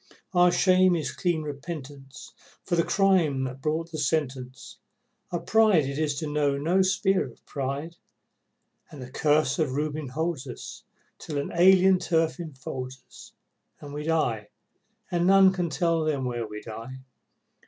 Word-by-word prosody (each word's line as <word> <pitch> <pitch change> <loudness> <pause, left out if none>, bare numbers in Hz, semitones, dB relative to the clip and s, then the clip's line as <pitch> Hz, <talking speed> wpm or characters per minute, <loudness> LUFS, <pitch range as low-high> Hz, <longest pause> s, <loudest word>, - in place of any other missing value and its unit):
Our 175 0 +5
shame 185 0 +4
is 150 -6 -2
clean 170 -1 -1
repentance 140 -2 -8 0.3
for 175 - -1
the 170 - +3
crime 175 -10 +2
that 130 0 -5
brought 160 +3 -2
the 155 - -5
sentence, 135 -3 -3 0.5
Our 175 - -1
pride 215 -9 +4
it 140 +2 -4
is 150 -2 0
to 155 +2 -4
know 145 -1 0
no 170 +7 +2
spur 190 0 +2
of - - -14
pride, 140 +4 -4 0.9
And 150 - -12
the 125 0 -9
Curse 155 +4 +1
of 150 -5 0
Reuben 150 +1 -2
holds 150 +1 -3
us 120 - -9 0.4
till 150 - -5
an 140 - -3
alien 185 +1 +5
turf 165 -1 0
enfolds 130 -4 -7
us - - -15 0.5
And 145 -1 -10
we 150 - -4
die, 120 -10 0 0.6
and 175 0 +1
none 195 0 +6
can 175 -3 -2
tell 165 +1 0
Them 145 -4 -1
where 120 -2 -3
we 105 0 -8
died. 115 +4 -9
155 Hz, 155 wpm, -26 LUFS, 135-175 Hz, 0.9 s, none